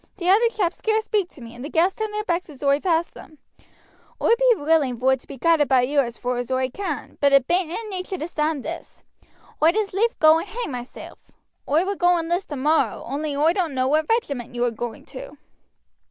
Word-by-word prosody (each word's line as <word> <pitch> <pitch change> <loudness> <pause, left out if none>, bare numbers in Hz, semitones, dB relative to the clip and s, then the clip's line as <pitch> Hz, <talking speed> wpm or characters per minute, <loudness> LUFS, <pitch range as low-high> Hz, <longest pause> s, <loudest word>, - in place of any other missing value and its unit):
T' 355 -2 -4
other 420 +6 +5
chaps 380 -6 -1
scarce 435 0 0
speak 405 -5 0
to 275 - -16
me, 230 0 -10
and 245 +1 -10
the 290 - -5
gals 345 +4 +2
turn 435 0 -3
their 425 0 -3
backs 350 -3 -2
as 290 -2 -12
oi 280 0 +3
pass 335 -1 0
them. 310 - -14 0.8
Oi - - +1
be - - +4
willing 290 - +1
vor 260 +2 +3
to 255 - -17
be 275 - -9
guided 315 +1 +3
by 260 -2 +4
you 280 +4 +1
as 235 -4 -1
far 250 0 -2
as 245 0 -4
oi 260 0 0
can; 355 -2 -5
but 280 -1 +4
it 275 -2 +5
bain't 350 +1 +1
in 430 +6 -5
nature 375 0 -4
to 315 - -4
stand 305 -4 -2
this. 335 +1 -8 0.6
Oi'd 330 +6 +4
as 415 -2 -1
lief 450 +5 +1
go 315 +1 +6
and 345 - -6
hang 455 -3 -5
myself. 245 0 -8 0.5
Oi 315 +6 +3
would 400 0 -3
go 355 0 +4
and 330 0 -3
list 350 +2 -1
tomorrow, 290 -5 0
only 285 +3 -3
oi 310 +4 +3
don't 345 -7 -2
know 255 0 +1
what 310 +3 +1
regiment 280 - -1
you 240 0 +1
are 240 - 0
going 230 0 -6
to." - - -10
315 Hz, 230 wpm, -23 LUFS, 270-375 Hz, 0.8 s, go